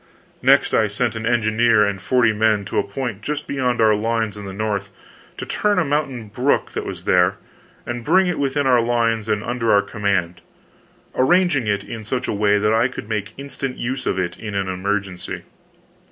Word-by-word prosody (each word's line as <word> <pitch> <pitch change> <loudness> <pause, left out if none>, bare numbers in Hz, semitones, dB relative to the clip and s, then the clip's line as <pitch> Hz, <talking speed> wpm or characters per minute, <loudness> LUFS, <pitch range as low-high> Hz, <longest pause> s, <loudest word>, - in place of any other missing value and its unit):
Next, - - +4
I 110 - +3
sent 115 +3 -1
an 110 0 -3
engineer 110 -1 +3
and 100 -2 -3
forty 115 +2 +3
men 105 -1 +2
to 95 - -1
a - - +1
point 110 0 -5
just 150 +6 -3
beyond 125 -3 -1
our 110 -1 +5
lines 110 0 -1
on 105 -1 -8
the 95 0 -7
south, 105 -2 -2 0.5
to - - -5
turn 205 -1 0
a 180 - +2
mountain 140 -6 -2
brook 125 +7 0
that - - -4
was - - -6
there, 90 +1 +3 0.5
and 120 0 -4
bring 185 +8 +4
it 180 -1 -1
within 140 0 0
our 125 -2 +4
lines 115 -2 0
and 105 0 0
under 120 -1 0
our 100 -1 +5
command, 100 -5 -1 0.7
arranging 150 -3 +3
it 100 -1 0
in 115 +1 -7
such 125 +4 -3
a - - -1
way 105 0 +3
that 105 +1 +2
I 115 +2 +3
could 120 -4 -8
make 105 -2 -3
instant 135 -1 -5
use 130 +2 -3
of - - 0
it 85 -2 -2
in 105 -2 -6
an 100 -1 -1
emergency. 95 0 -3
110 Hz, 195 wpm, -21 LUFS, 100-125 Hz, 0.7 s, our